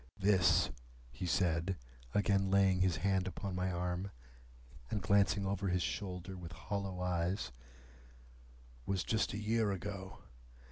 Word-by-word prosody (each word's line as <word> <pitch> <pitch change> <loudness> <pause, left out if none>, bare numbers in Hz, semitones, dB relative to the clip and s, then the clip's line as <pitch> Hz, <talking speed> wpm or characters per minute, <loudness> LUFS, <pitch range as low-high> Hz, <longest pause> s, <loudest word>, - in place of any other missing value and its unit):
"This," 95 -4 +4 0.4
he - - -4
said, 85 +1 +1 0.4
again 100 -1 +3
laying 95 -1 +4
his 95 -2 +3
hand 95 -2 +2
upon 95 +1 -4
my 90 +1 0
arm, 90 +2 -2 0.8
and 105 - 0
glancing 100 +1 +3
over 100 0 -1
his 90 -1 +1
shoulder 95 -1 -4
with 85 -2 -8
hollow 100 0 -3
eyes, 90 -3 0 1.4
"was 95 -2 0
just 110 -2 +1
a - - -2
year 110 0 +1
ago. 95 0 -5
95 Hz, 130 wpm, -35 LUFS, 90-100 Hz, 1.4 s, This